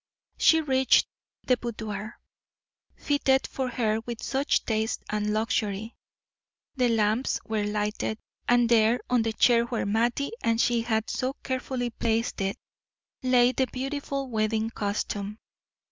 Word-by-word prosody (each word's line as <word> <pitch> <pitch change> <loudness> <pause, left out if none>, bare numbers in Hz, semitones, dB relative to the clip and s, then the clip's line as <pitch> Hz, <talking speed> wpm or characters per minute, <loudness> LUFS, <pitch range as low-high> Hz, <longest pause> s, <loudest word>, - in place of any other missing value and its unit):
She 320 0 +5
reached 265 -3 +4 0.4
the 250 - +3
boudoir, 215 -2 -6 0.8
fitted 270 -2 +1
for 260 -1 -3
her 220 -3 0
with 235 0 -7
such 275 +2 0
taste 220 0 -1
and 210 0 0
luxury. 215 0 -1 0.8
The 250 -3 +2
lamps 225 +2 +1
were 215 -2 -1
lighted, 210 +1 -2 0.3
and 240 -1 +5
there, 230 +1 +4
on 250 -2 +4
the 225 0 -1
chair 235 +1 +4
where 235 -1 -2
Mattie 235 +6 0
and 230 0 +2
she 235 -1 +2
had 220 -1 -1
so 260 +1 -1
carefully 255 -2 -2
placed 230 -1 -1
it, 195 0 -1 0.6
lay 250 -1 +4
the 260 0 0
beautiful 275 +1 -3
wedding 220 -1 0
costume. 205 -1 -3
230 Hz, 130 wpm, -27 LUFS, 215-255 Hz, 0.8 s, She